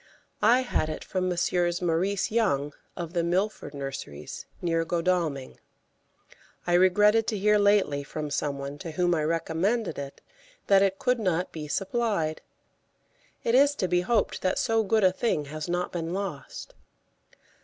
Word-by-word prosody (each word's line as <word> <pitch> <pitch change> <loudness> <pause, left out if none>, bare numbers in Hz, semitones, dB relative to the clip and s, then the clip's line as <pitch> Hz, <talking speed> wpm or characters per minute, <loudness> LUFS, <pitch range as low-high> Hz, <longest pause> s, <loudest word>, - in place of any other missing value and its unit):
I 240 +4 +5
had 240 -10 -1
it 155 - -5
from 185 -1 -2
Messrs. 175 0 0
Maurice 180 +4 0
Young, 150 -11 +1 0.2
of 170 -1 -5
the 170 -2 +1
Milford 180 -2 -1
Nurseries, 135 - -7
near 165 -1 0
Godalming. 165 -5 -1 1.1
I 175 - 0
regretted 210 +5 +4
to 215 - -1
hear 210 +1 +3
lately 200 -9 +3
from 150 +1 -5
some 145 -1 -1
one 140 +1 -6
to 165 0 -7
whom 175 +1 +2
I 155 -2 +1
recommended 165 +5 -1
it 140 -1 -7 0.5
that 195 -1 +5
it 195 -1 +2
could 250 +3 +1
not 185 -4 0
be 155 -2 -6
supplied. 195 -3 -1 1.0
It 230 - +1
is 280 +3 +5
to 185 - -1
be 180 0 +2
hoped 210 +4 0
that 185 - 0
so 225 -1 +2
good 220 0 +1
a 185 - +6
thing 185 -6 -1
has 155 +2 -5
not 175 +1 -1
been 170 0 -3
lost. 185 -9 -6
180 Hz, 155 wpm, -27 LUFS, 155-205 Hz, 1.1 s, a